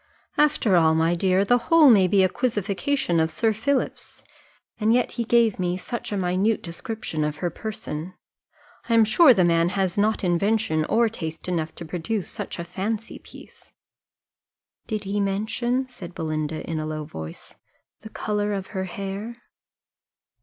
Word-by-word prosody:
After 295 -10 +3
all, 160 -2 +4
my 165 +1 +2
dear, 185 +2 +2
the 245 +3 +4
whole 330 -3 +7
maybe 195 -4 +5
a - - +5
quizzification 205 -3 0
of 160 - +1
Sir 220 +7 +1
Philip's 265 +5 -2 0.6
and 220 +2 +3
yet 250 - +1
he 235 - -2
gave 230 -3 +3
me 180 0 0
such 235 +5 -5
a 205 - -1
minute 190 +4 +1
description 170 -2 -4
of 150 0 -1
her 175 +2 -3
person! 185 -4 -6 0.7
I 230 - +3
am 225 -1 +6
sure 285 +7 +6
the 190 -7 +4
man 170 0 +3
has 190 -1 -1
not 215 +1 +1
invention 175 -2 +1
or 230 +5 +3
taste 160 -8 -6
enough 165 -3 -2
to 170 - -8
produce 180 +5 -3
such - - -6
a 170 - -4
fancy 205 +5 -4
piece." - - -15 1.1
"Did 215 -2 -3
he 200 +1 -2
mention," 220 +6 -1
said 185 -9 -10
Belinda, 155 -1 -3
in 165 -2 -2
a 155 - -3
low 155 -1 -4
voice, 80 - -9 0.5
"the 220 - -11
colour 210 -1 -2
of 195 -1 -4
her 190 -1 -2
hair?" 200 +5 -5
195 Hz, 160 wpm, -24 LUFS, 170-225 Hz, 1.1 s, whole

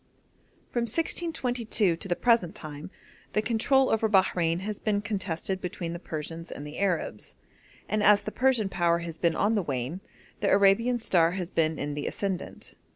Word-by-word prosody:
From 235 -1 0
1622 245 - 0
to 170 - -6
the 175 - +1
present 230 -6 +2
time 150 -4 -7 0.4
the 215 - +2
control 260 +4 +3
over 220 0 +2
Bahrein 180 -4 +2
has 210 +1 -4
been 210 -2 0
contested 190 -3 -3
between 175 -2 -4
the 170 - -6
Persians 165 0 -6
and 145 - -7
Arabs, 165 - -2 0.5
and 215 +1 0
as 205 0 +5
the 215 - -4
Persian 255 -5 +2
power 170 -3 +2
has 165 -1 -7
been 170 -2 +2
on 210 +3 +2
the 210 - +2
wane, 140 +3 -3 0.4
the 205 - +1
Arabian 200 +5 +4
star 170 -6 +3
has 185 -1 -4
been 160 -1 +1
in 145 +1 -3
the 145 0 -3
ascendent. 195 -3 -4
190 Hz, 165 wpm, -27 LUFS, 165-215 Hz, 0.5 s, as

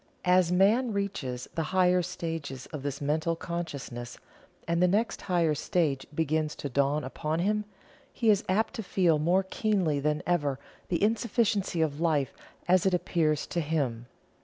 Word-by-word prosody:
As 180 -1 +4
man 215 +6 +3
reaches 150 -11 -3
the 165 - -1 0.2
higher 180 0 +4
stages 165 -6 -5
of 150 - -4
this 140 0 -4
Mental 155 +3 0
Consciousness, 155 -9 -5 0.5
and 170 +1 +1
the 180 - +5
next 210 +6 0
higher 170 -4 +1
stage 150 -4 0
begins 155 -1 0
to 145 - -5
dawn 140 +3 +1
upon 155 +4 -3
him, 210 +4 0 0.5
he 225 -3 +3
is 205 - +2
apt 220 +4 +1
to - - -4
feel 180 -5 +2
more 175 +5 +3
keenly 190 -6 0
than 150 +1 0
ever 145 -6 +1 0.3
the 175 +2 0
insufficiency 210 -4 +1
of 150 0 -2
Life 155 -5 +1 0.3
as 185 +1 +4
it 185 - +3
appears 155 -4 0
to 170 - -2
him. 135 -7 -2
170 Hz, 160 wpm, -28 LUFS, 150-185 Hz, 0.5 s, the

